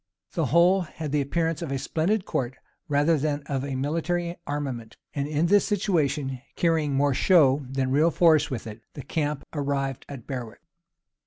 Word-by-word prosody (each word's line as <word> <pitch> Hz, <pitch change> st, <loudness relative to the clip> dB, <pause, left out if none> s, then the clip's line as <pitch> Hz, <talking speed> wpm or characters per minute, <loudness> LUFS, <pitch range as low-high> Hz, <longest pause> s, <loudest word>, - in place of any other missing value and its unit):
The -, -, 0 dB
whole 175 Hz, +4 st, +4 dB
had 155 Hz, -3 st, -6 dB
the 150 Hz, -1 st, +2 dB
appearance 165 Hz, +3 st, -1 dB
of 165 Hz, -5 st, -4 dB
a 135 Hz, -, 0 dB
splendid 180 Hz, +9 st, 0 dB
court, 130 Hz, 0 st, -2 dB, 0.3 s
rather 150 Hz, +2 st, +2 dB
than 145 Hz, 0 st, -1 dB
of 135 Hz, -2 st, -2 dB
a 140 Hz, -1 st, -3 dB
military 170 Hz, +5 st, -1 dB
armament; 130 Hz, -6 st, -4 dB, 0.2 s
and 140 Hz, 0 st, -2 dB
in 150 Hz, +2 st, +1 dB
this 205 Hz, +3 st, +4 dB
situation, 150 Hz, -, 0 dB
carrying 160 Hz, -4 st, +1 dB
more 140 Hz, 0 st, +3 dB
show 145 Hz, -3 st, +4 dB
than 130 Hz, -1 st, -1 dB
real 150 Hz, +5 st, +4 dB
force 160 Hz, -2 st, +4 dB
with 125 Hz, -5 st, -4 dB
it, 110 Hz, 0 st, -8 dB
the 140 Hz, -, -7 dB
camp 150 Hz, -3 st, -2 dB
arrived 140 Hz, -3 st, -2 dB
at 135 Hz, -5 st, -8 dB
Berwick. 125 Hz, -1 st, -6 dB
145 Hz, 170 wpm, -26 LUFS, 135-165 Hz, 0.3 s, whole